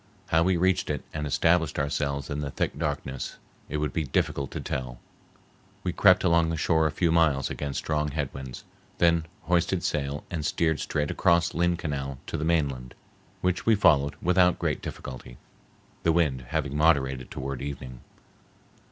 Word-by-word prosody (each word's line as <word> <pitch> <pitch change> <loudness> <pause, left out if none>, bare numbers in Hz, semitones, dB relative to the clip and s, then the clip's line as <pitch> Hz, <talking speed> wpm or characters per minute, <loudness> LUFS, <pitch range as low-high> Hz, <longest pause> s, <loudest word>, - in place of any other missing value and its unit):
How 80 - +4
we 90 +1 +3
reached 95 +1 +1
it 75 -3 -2
and 75 -1 -3
established 80 +2 +2
ourselves 70 -1 -1
in 70 - -2
the 70 - -3
thick 65 - -2
darkness 75 -3 -3 0.3
it 75 - -2
would 75 -2 -2
be 80 - 0
difficult 70 0 -1
to - - -5
tell. 60 -2 -4 0.9
We 90 - -1
crept 95 0 +5
along 85 -2 +3
the 80 - -2
shore 80 +1 +2
a - - -2
few 85 +2 +1
miles 80 -5 +2
against 70 -2 -4
strong 75 -1 -1
head 70 -2 -3
winds, 65 -2 -8 0.3
then 85 -1 +3 0.2
hoisted 85 +1 +1
sail 70 -1 -2
and 85 -4 -3
steered 80 -2 +1
straight 75 -1 -1
across 85 0 +2
Lynn 85 +1 +1
Canal 70 -5 -4
to - - -5
the 75 - -2
mainland, 70 -7 0 0.5
which 90 +3 -1
we 115 - +6
followed 75 -8 +4
without 90 0 +4
great - - -1
difficulty, 65 -1 -8 0.6
the 85 - +3
wind 75 -7 +1
having 75 -1 -2
moderated 70 -5 +2
toward 70 0 -5
evening. 65 -3 -6
75 Hz, 170 wpm, -27 LUFS, 70-85 Hz, 0.9 s, we